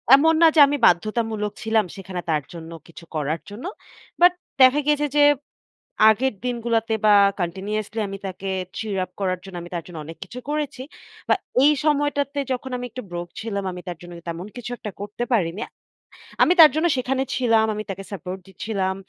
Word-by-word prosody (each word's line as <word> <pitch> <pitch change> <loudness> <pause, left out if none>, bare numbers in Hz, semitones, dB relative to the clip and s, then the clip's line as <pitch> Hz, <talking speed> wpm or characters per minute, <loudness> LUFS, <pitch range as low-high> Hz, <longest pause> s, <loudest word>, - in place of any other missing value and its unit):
এমন 320 +4 +4
না 330 - +9
যে, - - +5
আমি 290 - 0
বাধ্যতামূলক 215 +3 +1
ছিলাম 220 -2 +2
সেখানে 190 -2 -6
তার 150 -3 +1
জন্য 165 -1 -9 0.2
কিছু 170 - -13
করার 155 +2 -1
জন্য। 210 +8 -9 0.6
বাট 355 +1 +8 0.3
দেখা 260 +3 +7
গেছে 295 0 +2
যে, 290 - +7 0.9
আগের 255 +4 +2
দিনগুলোতে 230 -2 0
বা, 210 - +7 0.3
কান্টিনিউয়াসলি 200 +5 -3
আমি 195 0 -6
তাকে 190 +1 -6 0.3
cheer 215 -3 -3
up 185 - -9
করার 185 -2 -1
জন্য 190 -2 -10
আমি 175 - -9
তার 170 - -3
জন্য 175 - -10
অনেক 165 +1 -9
কিছু 240 +6 -9
করেছি। 295 -4 -2 0.5
বা, - - +4 0.3
এই 295 - +7
সময়টাতে 285 -1 +1
যখন 255 +1 -3
আমি 245 - -5
একটু 255 - -6
broke 175 0 -5
ছিলাম, 205 -3 -3
আমি 180 0 -8
তার 175 - -5
জন্য 175 0 -11
কিন 170 - -14
তেমন 170 +3 -5
কিছু 245 0 -6
একটা 210 - -6
করতে 210 +4 -4
পারিনি। 180 -3 0 0.8
আমি 355 - +5
তার 315 -2 +11
জন্য 320 +2 +2
সেখানে 260 +1 0
ছিলাম, 230 -3 +3
আমি 215 - -4
তাকে 195 0 -5
সাপোর্ট 185 0 -6
দিচ্ছিলাম। 190 0 -2
215 Hz, 180 wpm, -23 LUFS, 185-255 Hz, 0.9 s, তার